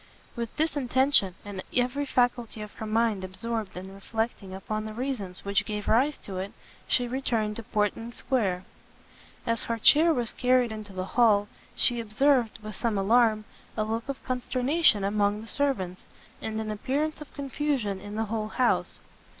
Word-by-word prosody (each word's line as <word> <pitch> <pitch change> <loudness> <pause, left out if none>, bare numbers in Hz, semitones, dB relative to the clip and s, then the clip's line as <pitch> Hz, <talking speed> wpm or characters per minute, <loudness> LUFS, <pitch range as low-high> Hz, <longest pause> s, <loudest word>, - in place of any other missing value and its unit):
With 235 -2 -5
this 315 -1 +1
intention, 260 -7 +3
and 200 -2 -5 0.2
every 255 +3 +1
faculty 245 -4 0
of 210 - -9
her 220 - -6
mind 220 -3 +1
absorbed 215 +1 -4
in 190 +1 -7
reflecting 220 0 -3
upon 215 +3 -4
the 215 0 -6
reasons 230 -9 -4
which 200 0 +2
gave 210 0 -4
rise 265 +6 +3
to 190 -2 -6
it, 195 +2 -5 0.3
she 245 -1 +2
returned 230 -4 -1
to - - -4
Portman 215 +3 -1
square. 200 -8 0 0.8
As 230 -1 +1
her 230 - -1
chair 310 +9 +6
was 245 -7 +1
carried 250 -2 +3
into 215 -2 -7
the 185 -1 -4
hall, 210 -2 +4 0.3
she 245 -1 +5
observed, 235 +2 +2
with 215 -1 -6
some 225 -2 0
alarm, 215 +1 +3 0.3
a 215 - +2
look 225 +4 -3
of 275 - -4
consternation 255 -1 +2
among 205 +1 +1
the 225 - -10
servants, 205 -11 -1 0.4
and 220 0 -3
an 215 -1 -3
appearance 285 +9 -2
of 300 - -10
confusion 275 -8 -1
in 205 +1 -7
the 225 +1 0
whole 215 0 -2
house. 245 +3 0
225 Hz, 165 wpm, -27 LUFS, 205-255 Hz, 0.8 s, chair